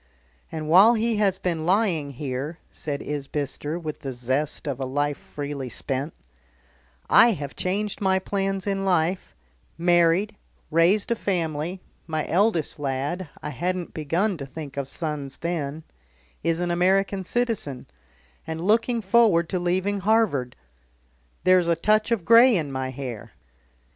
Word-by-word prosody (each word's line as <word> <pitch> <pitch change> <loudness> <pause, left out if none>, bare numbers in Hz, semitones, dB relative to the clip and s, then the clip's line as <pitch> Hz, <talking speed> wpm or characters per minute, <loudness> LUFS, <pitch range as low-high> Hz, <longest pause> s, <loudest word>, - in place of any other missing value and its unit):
"And 155 -1 -4
while 195 +9 +7
he 225 0 0
has 195 -3 +2
been 170 -4 -2
lying 180 -8 +1
here," 135 +4 -4
said 145 -2 -4
Isbister, 145 +1 -3
with 155 -3 -6
the 135 -3 -5
zest 130 +5 -2
of 140 -2 -3
a 135 - -2
life 145 +2 -1
freely 145 -3 -6
spent, 135 +5 -3 0.9
"I 235 0 +6
have 145 -6 -6
changed 200 +3 -2
my 190 -1 +3
plans 195 0 -2
in 195 -1 -1
life; 180 -1 0 0.4
married, 175 +4 +3 0.4
raised 180 +8 +3
a - - +3
family, 170 -3 -2 0.3
my 155 -2 -2
eldest 175 -4 +1
lad 145 +5 -2
I - - -4
hadn't 180 +5 -3
begun 170 +6 0
to 140 - -6
think 140 0 -8
of 140 -2 -3
sons 145 -2 -5
then 160 -3 -3 0.6
is 165 0 0
an 175 0 -1
American 190 +2 +2
citizen, 215 - -2 0.6
and 160 0 -4
looking 225 +5 +1
forward 195 -5 +4
to 185 - -1
leaving 185 +3 0
Harvard. 190 - +1 0.9
There's 185 -1 +4
a 170 - +3
touch 215 +6 +2
of 225 -8 0
grey 235 +1 +7
in 150 -4 -3
my 130 -1 -3
hair. 130 -5 -7
170 Hz, 145 wpm, -25 LUFS, 145-195 Hz, 0.9 s, while